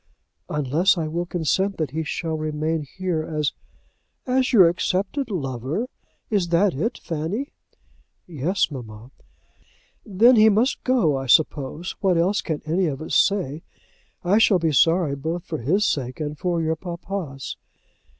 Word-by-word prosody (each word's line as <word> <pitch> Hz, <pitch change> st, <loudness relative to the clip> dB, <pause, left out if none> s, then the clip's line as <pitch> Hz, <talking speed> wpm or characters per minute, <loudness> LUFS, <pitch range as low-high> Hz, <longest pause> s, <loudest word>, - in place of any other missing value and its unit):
"Unless 150 Hz, +7 st, +2 dB
I 160 Hz, -2 st, -1 dB
will 170 Hz, +3 st, -3 dB
consent 190 Hz, +4 st, 0 dB
that 155 Hz, -5 st, -2 dB
he 160 Hz, +2 st, -2 dB
shall 160 Hz, +1 st, -3 dB
remain 155 Hz, +1 st, -2 dB, 0.2 s
here 180 Hz, -4 st, -1 dB
as 155 Hz, -2 st, -2 dB, 0.4 s
" -, -, -48 dB
"As 260 Hz, -, +1 dB
your 190 Hz, -8 st, +7 dB
accepted 195 Hz, -, -1 dB
lover. 140 Hz, -, -3 dB, 0.5 s
Is 200 Hz, -5 st, +1 dB
that 175 Hz, +3 st, +3 dB
it, 220 Hz, -, -2 dB
Fanny?" 170 Hz, -, -4 dB, 0.7 s
"Yes, 170 Hz, +3 st, -1 dB
mamma." 115 Hz, -2 st, -9 dB, 0.9 s
"Then 230 Hz, +4 st, +5 dB
he 220 Hz, 0 st, +7 dB
must 225 Hz, +6 st, +1 dB
go, 235 Hz, -, +2 dB
I 135 Hz, -, -5 dB
suppose. 150 Hz, +5 st, +1 dB
What 185 Hz, -3 st, +2 dB
else 185 Hz, +5 st, +2 dB
can 155 Hz, -3 st, -4 dB
any 175 Hz, +3 st, +1 dB
of 140 Hz, -3 st, -3 dB
us 160 Hz, -, -6 dB
say? 165 Hz, -7 st, +2 dB, 0.6 s
I 195 Hz, +5 st, +3 dB
shall 210 Hz, -3 st, +5 dB
be 165 Hz, -2 st, 0 dB
sorry 165 Hz, 0 st, +3 dB
both 160 Hz, +5 st, -4 dB
for 155 Hz, -, -4 dB
his 180 Hz, -, +1 dB
sake 130 Hz, -4 st, -2 dB
and 150 Hz, -1 st, -3 dB
for 170 Hz, +1 st, -1 dB
your 160 Hz, 0 st, 0 dB
papa's." 170 Hz, -4 st, -6 dB
165 Hz, 150 wpm, -23 LUFS, 150-190 Hz, 0.9 s, your